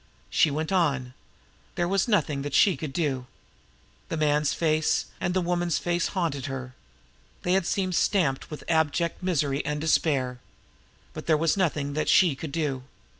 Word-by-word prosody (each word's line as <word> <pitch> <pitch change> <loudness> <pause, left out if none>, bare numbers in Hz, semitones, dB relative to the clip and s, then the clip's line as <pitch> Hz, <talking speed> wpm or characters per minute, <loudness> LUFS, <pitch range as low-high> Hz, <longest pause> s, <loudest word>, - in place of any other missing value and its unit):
She 160 - +4
went 155 +4 -3
on. 140 -9 +1 0.6
There 175 - 0
was 195 +3 +1
nothing 155 -10 +1
that 140 0 -3
she 195 -5 +5
could 140 +1 -5
do. 135 -5 -2 0.8
The 165 - -2
man's 150 -1 +2
face 155 -2 +1 0.2
and 180 - -1
the 185 - +2
woman's 175 -1 0
face 175 -1 0
haunted 155 -8 -2
her. 130 -1 -6 0.7
They 180 - +1
had 190 -2 +2
seemed 185 -2 0
stamped 165 -7 +1
with 150 - -7
such - - -12
abject 160 +2 +1
misery 150 -6 0
and 150 0 -2
despair. 140 -5 +1 0.7
But - - -8
there 155 - +4
was 160 0 +2
nothing 150 -7 0
that 155 +1 -1
she 175 -5 +5
could 140 +2 -7
do. 145 -4 -2
155 Hz, 170 wpm, -26 LUFS, 140-175 Hz, 0.8 s, she